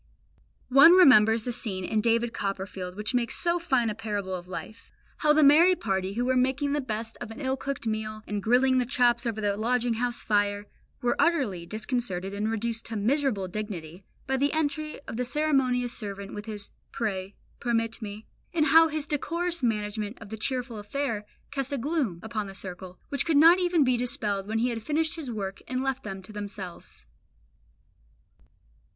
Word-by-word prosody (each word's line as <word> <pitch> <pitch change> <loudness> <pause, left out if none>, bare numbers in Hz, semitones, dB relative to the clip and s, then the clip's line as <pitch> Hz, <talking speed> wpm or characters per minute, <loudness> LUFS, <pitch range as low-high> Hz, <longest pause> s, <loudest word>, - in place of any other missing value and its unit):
One 275 +6 +9
remembers 225 - +7
the 245 - -2
scene 200 -6 -4
in 215 +3 0
David 230 +1 +1
Copperfield 190 -3 -4
which 210 +4 -3
makes 245 -2 0
so 345 0 +1
fine 265 -9 +1
a 215 - -1
parable 205 -3 -4
of 180 -1 -5
life; 215 +4 -8 0.3
how 300 - +3
the 305 0 +5
merry 325 +6 +7
party 190 - -2
who 240 +3 -1
were 260 0 +2
making 265 +3 +1
the 295 - 0
best 225 -2 -5
of - - -5
an 225 - -9
ill 265 -2 0
cooked 275 -2 -5
meal, 215 -1 -3
and 205 -1 -3
grilling 255 +4 +3
the 250 - +1
chops 240 -2 +2
over 220 -2 -2
the 205 -1 0
lodging 240 +2 +1
house 240 +1 -2
fire, 205 -1 +1 0.4
were 240 - +2
utterly 235 - +1
disconcerted 215 -4 -2
and 210 +2 -1
reduced 230 +1 -2
to 230 - -5
miserable 225 -2 0
dignity 185 -3 -6 0.2
by 265 0 0
the 280 +2 +1
entry 310 0 -2
of 230 - -7
the 250 - 0
ceremonious 255 -3 +1
servant 200 -2 -6
with 210 +1 -7
his 210 -2 -6 0.2
"Pray, 195 -3 -3 0.2
permit 230 -1 -1
me," 210 0 -7 0.3
and 310 -2 +3
how 325 +2 +7
his 310 -1 -3
decorous 335 +4 -1
management 210 -1 -1
of 210 - -11
the 220 - -5
cheerful 245 0 -2
affair 210 -1 -3 0.2
cast 275 -1 -2
a 280 - -1
gloom 265 - -1
upon 220 -2 -3
the 195 - -9
circle 185 -1 -8
which 280 -2 +1
could 320 -3 +2
not 335 +5 +8
even 350 -4 +3
be 255 -2 +2
dispelled 210 -5 -1
when 220 +1 -1
he 240 +3 +1
had 230 -2 -3
finished 315 +6 0
his 310 -6 -6
work 195 -4 -4
and 255 0 -2
left 270 0 -2
them 195 -2 -6
to 215 - -12
themselves. 200 - -8
230 Hz, 185 wpm, -27 LUFS, 205-270 Hz, 0.4 s, One